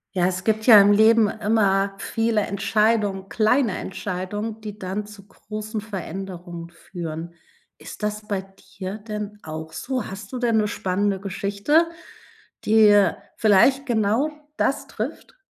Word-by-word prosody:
Ja, 180 -1 +3
es 185 0 -2
gibt 220 +1 0
ja 220 -4 +10
im 200 +1 +6
Leben 220 +1 +5
immer 200 -2 +1
viele 225 +1 0
Entscheidungen, 205 -1 0
kleine 225 -1 +2
Entscheidungen, 205 +4 -5
die 210 -1 -7
dann 200 +1 -4
zu 205 -1 -14
großen 215 +2 -6
Veränderungen 185 -4 -7
führen. 170 -1 -7 0.5
Ist - - -10
das 210 0 -3
bei 195 -2 -2 0.3
dir 195 +2 -5
denn 210 -1 -6
auch 160 0 -7
so? 250 +5 -3
Hast 195 +1 -8
du 255 - -4
denn 235 -2 +1
'ne 210 -1 +2
spannende 195 0 -1
Geschichte, 200 - +1 0.8
die 210 -2 +6 0.3
vielleicht 260 +7 +4
genau 225 +4 +1 0.3
das - - 0
trifft? - - -6
205 Hz, 135 wpm, -23 LUFS, 190-220 Hz, 0.8 s, ja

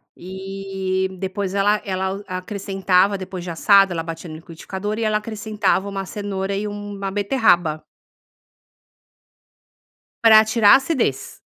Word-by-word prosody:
e, 190 0 -4
depois 190 0 -3
ela 205 +1 +2
ela 190 +1 -2
acrescentava, 195 0 0
depois 185 -1 -7
de 175 - -5
assado, 195 +2 +4
ela 165 - -3
batia 165 +1 -7
no 155 - -8
liquidificador 190 +6 -6
e - - -1
ela 215 0 +2
acrescentava 210 -2 -1
uma 195 -1 -4
cenoura 200 -1 -4
e 205 +2 -2
uma 205 -1 -5
beterraba. 195 - +2 2.4
Pra 220 -1 +8
atirar 215 -1 +5
a - - +10
acidez. 270 0 -1
195 Hz, 125 wpm, -21 LUFS, 185-205 Hz, 2.4 s, a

